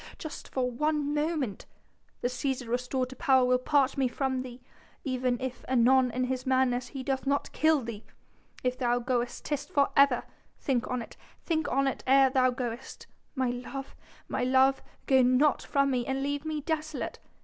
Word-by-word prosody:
just 315 - -8
for 250 -1 -1
one 295 +3 0
moment... 295 - -2 0.5
the - - +1
Cæsar 255 0 -2
restored 250 +2 -1
to 260 - -9
power 265 -5 +4
will 250 0 +3
part 275 0 +2
me 265 - +3
from 260 +1 -1
thee... 250 -1 -9 0.4
even 255 -3 -1
if 255 -1 -5
anon 255 +1 +4
in 250 +2 -2
his 255 0 -2
madness 255 -1 +1
he 260 +1 -7
doth 270 0 -2
not 280 0 0
kill 315 -3 +3
thee. 225 -2 -7 0.6
If 250 0 -1
thou 245 -1 +2
goest 245 0 -2
'tis 290 -1 -2
for 280 -1 +2
ever.... 275 -3 +5 0.3
Think 255 -3 -1
on 250 -2 -2
it... - - -14 0.3
think 315 -2 0
on 275 +1 +2
it 270 - -3
ere 270 0 +6
thou 255 -1 +4
goest.... 245 0 -5 0.3
My 260 -2 +1
love... 260 +2 -7 0.3
my - - -2
love, 265 +1 +4 0.2
go 265 -1 +5
not 255 +4 +3
from 275 -1 +1
me, 250 -2 0
and 270 0 -1
leave 285 +1 -2
me 310 -1 -2
desolate.... 310 0 -3
260 Hz, 180 wpm, -29 LUFS, 250-280 Hz, 0.6 s, ere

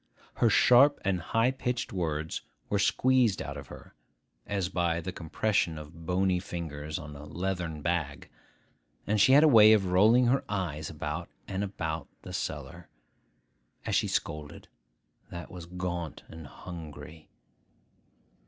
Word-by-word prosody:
Her 115 - +4
sharp 125 +6 +6
and 95 -2 +1
high 115 +9 +2
pitched 125 -2 -3
words 80 -4 -2 0.3
were 100 - +1
squeezed 125 -1 +3
out 70 - -5
of 70 -2 -8
her, - - -12 0.5
as 100 -3 -1
by 85 -2 0
the 90 +2 -5
compression 85 0 -1
of 80 +2 -11
bony 90 0 +2
fingers 80 -4 -5
on 75 -2 -8
a 70 - -10
leathern 85 0 -4
bag; 85 -4 -2 0.8
and 105 -1 +2
she 130 - +6
had 145 +2 +8
a - - +7
way 110 -5 +8
of 105 -3 +3
rolling 105 +7 +5
her 130 +3 +2
eyes 80 -7 -3
about 75 +2 -5 0.2
and 95 0 -2
about 80 -5 -4 0.2
the - - -8
cellar, - - -5 1.0
as - - -2
she - - +2
scolded, 75 -2 -4 0.6
that 85 0 -8
was 85 -2 -9
gaunt 85 -2 -4
and 80 -2 -10
hungry. 80 -1 -10
90 Hz, 145 wpm, -29 LUFS, 80-100 Hz, 1.0 s, had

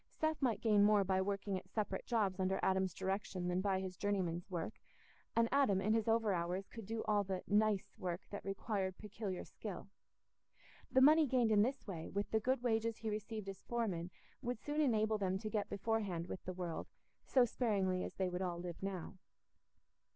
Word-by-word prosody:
Seth 315 -1 -1
might 230 -5 +1
gain 210 -3 +5
more 205 -1 +5
by 190 0 +2
working 200 0 -1
at 185 - -20
separate 200 -2 -2
jobs 205 -6 +1
under 190 +1 +1
Adam's 190 -1 +2
direction 190 0 -2
than 180 +1 +1
by 190 -1 +1
his 190 -1 -4
journeyman's 180 -3 -1
work, 175 +3 -4 0.6
and 230 0 +4
Adam, 270 -9 +4
in 210 +3 +2
his 225 -1 +1
overhours, 195 -5 +1
could 225 -4 -8
do 225 0 -2
all 210 -1 +2
the 190 -1 -3
"nice" 210 -1 +2
work 180 0 -2
that 205 - -5
required 195 -1 -2
peculiar 210 -3 -5
skill. 200 -3 -7 1.0
The 260 - +5
money 305 +2 +7
gained 245 -3 +3
in 210 -1 +6
this 260 +5 0
way, 170 -6 -5
with 200 +1 -2
the 220 - +3
good 250 +2 0
wages 225 -1 +1
he 220 -1 -3
received 215 0 -4
as 195 -1 -6
foreman, 195 -8 -2 0.3
would 245 -3 -2
soon 295 +7 -1
enable 220 -5 +2
them 190 -1 +1
to 215 +2 -5
get 210 -2 -1
beforehand 200 -5 -1
with 180 - -6
the 185 - -3
world, 175 -2 -4 0.4
so 255 -2 +4
sparingly 195 -6 +1
as - - -6
they 190 - 0
would 180 0 -3
all 175 -2 -1
live 175 -1 -6
now. 190 -1 -4
200 Hz, 190 wpm, -37 LUFS, 185-225 Hz, 1.0 s, money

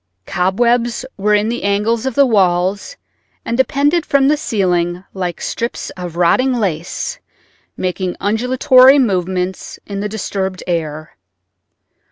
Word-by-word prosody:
Cobwebs 235 +7 0
were 210 +1 +2
in 210 +1 +1
the 240 - -3
angles 215 +4 0
of 260 - -3
the 280 - +5
walls 195 - +1 0.5
and 230 - -2
depended 285 +6 +2
from 275 -3 +2
the 300 - +4
ceiling 180 - -1
like 180 -3 -4
strips 235 +1 -4
of 180 -2 -7
rotting 255 +10 +3
lace 195 - -3 0.6
making 185 0 -3
undulatory 255 +5 +4
movements 185 -6 -1
in 200 -1 -5
the 210 +1 -3
disturbed 190 -3 -4
air. 155 -3 -4
205 Hz, 125 wpm, -17 LUFS, 180-245 Hz, 0.6 s, the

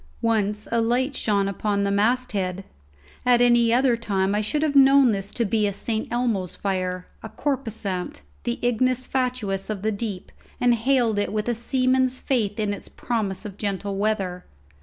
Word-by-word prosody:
Once 210 -2 0
a 230 0 +2
light 255 +4 0
shone 200 -4 +1
upon 200 +1 -1
the 200 - 0
masthead. 200 -4 0 0.6
At 245 -1 +4
any 240 -1 +4
other 250 0 +3
time 200 -4 -1
I 210 - +1
should 295 +9 -1
have 295 -2 0
known 275 -2 +7
this 195 -1 -3
to 235 - +1
be 210 +1 +1
a 200 - -2
St. 220 +2 -3
Elmo's 230 -7 -1
fire, 185 -2 -2 0.2
a 220 - -8
corposant, 220 - -3 0.2
the 120 - -2
ignis 255 +1 +1
fatuus 245 -8 -2
of 205 -2 -4
the 220 - +1
deep, 200 -3 -5 0.3
and 245 -1 +4
hailed 235 -2 +2
it 205 - -1
with 210 +1 -2
a 240 - +1
seaman's 255 +2 +1
faith 220 -7 -1
in 210 -1 0
its 200 - -8
promise 215 -6 -3
of 200 -2 -7
gentle 200 -1 -2
weather. 195 -3 -1
220 Hz, 175 wpm, -24 LUFS, 200-245 Hz, 0.6 s, known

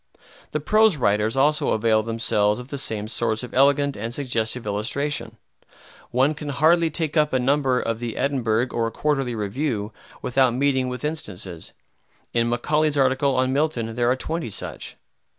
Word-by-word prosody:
The 150 - -1
prose 215 +3 +3
writers 105 0 +1
also 150 +3 +3
avail 110 0 +2
themselves 110 -1 +1
of 125 +1 -10
the 140 - -3
same 105 -4 -2
source 110 0 0
of 125 - -8
elegant 140 +1 +3
and 115 +3 -4
suggestive 120 -3 -2
illustration. 115 +3 -2 0.7
One 130 +5 +2
can 150 -1 -7
hardly 160 +4 +3
take 160 0 -2
up 150 -2 +2
a 130 - +3
number 135 0 +2
of 115 -2 -2
the 120 -2 -5
"Edinburgh" 125 -3 0
or 115 -1 0
"Quarterly 135 0 -1
Review" 110 0 -2 0.3
without 125 -1 +2
meeting 130 -1 +1
with 125 +3 -5
instances. 95 - -4 0.6
In 115 0 +1
Macaulay's 150 +5 +1
article 135 0 +2
on 130 0 +1
Milton 135 -6 -1
there 120 +1 +1
are 125 - +3
twenty 160 0 -3
such. 100 - -7
125 Hz, 160 wpm, -23 LUFS, 115-145 Hz, 0.7 s, prose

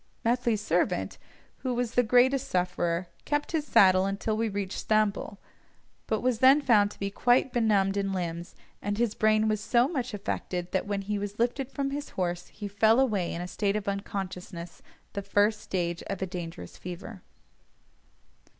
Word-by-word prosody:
Methley's 235 -2 +1
servant, - - 0 0.4
who 255 -2 -2
was 245 -1 -1
the 245 - +4
greatest 250 +3 +3
sufferer, 180 -1 0 0.2
kept 290 0 -1
his 310 -2 -1
saddle 185 -3 +5
until 200 +2 -1
we 225 +1 0
reached 200 -1 -3
Stamboul, 215 -2 0 0.7
but 220 - 0
was 245 -3 +1
then 265 +3 +7
found 220 -8 +4
to - - -14
be 200 0 -2
quite 245 +4 +2
benumbed 205 -4 +2
in 195 -1 0
limbs, 170 -2 -4 0.3
and 205 0 -2
his 235 -2 +1
brain 215 0 +3
was 215 -1 0
so 240 +3 +3
much 255 -7 -3
affected, 180 -3 -4
that 190 - -1
when 200 -1 -2
he 205 +1 -2
was 205 +1 -5
lifted 245 +3 0
from 275 -1 -2
his 290 +1 -4
horse 175 -1 -2
he 210 - -7
fell 220 +4 +4
away 210 -10 +1
in 170 - -4
a - - -5
state 200 +2 -1
of 210 -1 -3
unconsciousness, 185 -3 -5 0.3
the 200 - -3
first 205 +2 +2
stage 175 -2 -2
of 195 - -4
a 190 - -1
dangerous 165 - -7
fever. 180 +3 -8
205 Hz, 175 wpm, -28 LUFS, 190-235 Hz, 0.7 s, then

